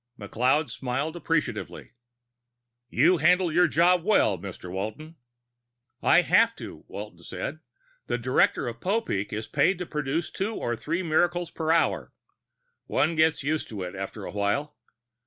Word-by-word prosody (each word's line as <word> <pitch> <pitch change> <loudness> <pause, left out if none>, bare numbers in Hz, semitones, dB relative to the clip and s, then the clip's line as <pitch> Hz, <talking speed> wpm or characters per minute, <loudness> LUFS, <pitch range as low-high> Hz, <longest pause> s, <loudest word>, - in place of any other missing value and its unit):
McLeod 130 +8 +1
smiled 135 +5 -3
appreciatively. 155 -10 -2 1.0
"You 170 +9 +4
handle 175 +3 +3
your 175 +1 +5
job 170 +2 +3
well, 190 - +3
Mr. 90 -1 -8
Walton." 110 - -5 0.9
"I - - +5
have - - +4
to," - - -10
Walton 100 -4 -8
said. 95 - -5 0.5
"The - - 0
director 125 +1 +2
of 115 -1 -6
Popeek 190 - -1
is 110 +1 -3
paid 155 +6 +2
to 180 - -4
produce 150 +1 -2
two 210 +3 -3
or 120 - -2
three 170 +10 -2
miracles 175 +1 +1
per 160 -1 -1
hour. 165 0 +1 0.8
One 160 +3 +1
gets 160 -2 +2
used 150 +2 -1
to 100 -4 -5
it, 90 - -6
after 95 +2 -6
a - - -6
while. 105 +9 -1
150 Hz, 145 wpm, -26 LUFS, 110-170 Hz, 1.0 s, your